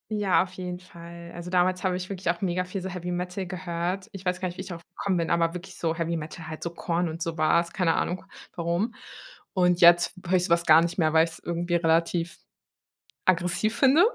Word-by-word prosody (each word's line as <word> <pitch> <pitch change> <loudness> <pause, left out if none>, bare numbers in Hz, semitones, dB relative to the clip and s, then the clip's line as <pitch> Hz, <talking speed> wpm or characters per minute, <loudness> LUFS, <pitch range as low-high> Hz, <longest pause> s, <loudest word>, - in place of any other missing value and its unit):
Ja, 205 -4 +3
auf 185 - -10
jeden 180 -1 -5
Fall. 170 -1 -11
Also, 175 +1 -7
damals 185 +1 +2
habe 185 -1 +1
ich 185 0 -5
wirklich 190 -3 -3
auch 170 0 0
mega 180 -1 0
viel 185 +1 -5
so 190 - -4
Heavy 180 -1 -5
Metal 180 +2 -3
gehört. 180 +1 -3
Ich 195 -1 -10
weiß 180 0 -1
gar 185 - -1
nicht, 175 - -10
wie - - -4
ich 185 - -8
darauf 170 -2 -7
gekommen 200 -2 0
bin, 170 -2 0
aber 170 -1 +2
wirklich 180 +2 -8
so 165 -1 -1
Heavy 165 0 -1
Metal 160 +1 -7
halt 155 - -7
so 170 - -3
Korn 170 +1 -1
und 165 +1 -6
sowas, 165 +1 +1
keine 175 -3 +2
Ahnung, 180 +2 -2 0.3
warum. 170 +7 -1 0.6
Und 180 -2 +3
jetzt 175 0 +6
höre 185 - +3
ich 180 - +3
so - - -3
etwas 170 0 +1
gar 160 +1 +8
nicht 170 +1 -2
mehr, 155 -3 +2
weil 160 0 +6
ich 165 - -2
es - - -11
irgendwie 175 0 -2
relativ 165 0 +1 0.9
aggressiv 185 +5 +2
finde. 280 +7 +6
175 Hz, 230 wpm, -26 LUFS, 170-185 Hz, 0.9 s, gar